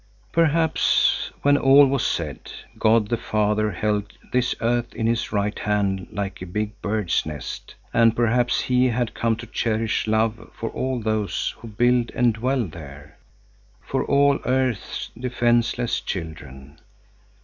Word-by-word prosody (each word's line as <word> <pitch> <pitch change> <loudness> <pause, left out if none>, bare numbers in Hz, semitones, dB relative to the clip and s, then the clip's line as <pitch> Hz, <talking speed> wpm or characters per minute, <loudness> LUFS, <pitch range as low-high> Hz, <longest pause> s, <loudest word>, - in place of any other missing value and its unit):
Perhaps, 165 -1 +2
when 145 0 +5
all 140 +1 +7
was 135 -2 0
said, 75 -6 -3 0.3
God 110 -1 +3
the 120 - +1
Father 105 -1 0
held 105 +1 -2 0.2
this 125 0 +1
earth 120 +1 -1
in 110 - -2
His 115 0 0
right 105 0 -1
hand 100 -3 -1
like 100 -2 -5
a 95 - -6
big 105 +3 -4
bird's 105 -4 0
nest, 75 -5 -7 0.2
and 115 -1 +4
perhaps 120 +1 +2
He 125 0 +2
had 120 -1 -1
come 115 -1 0
to - - -9
cherish 110 -1 -1
love 110 +1 0
for 115 - -4
all 130 -1 -2
those 110 -2 -1
who 115 - -10
build 120 +2 +2
and 120 -2 +3
dwell 125 +2 0
there, 75 -4 -11 0.6
for - - -2
all 140 0 +3
earth's 130 -4 -1
defenceless 120 -1 0
children. 75 -5 -7
115 Hz, 140 wpm, -23 LUFS, 105-125 Hz, 0.6 s, all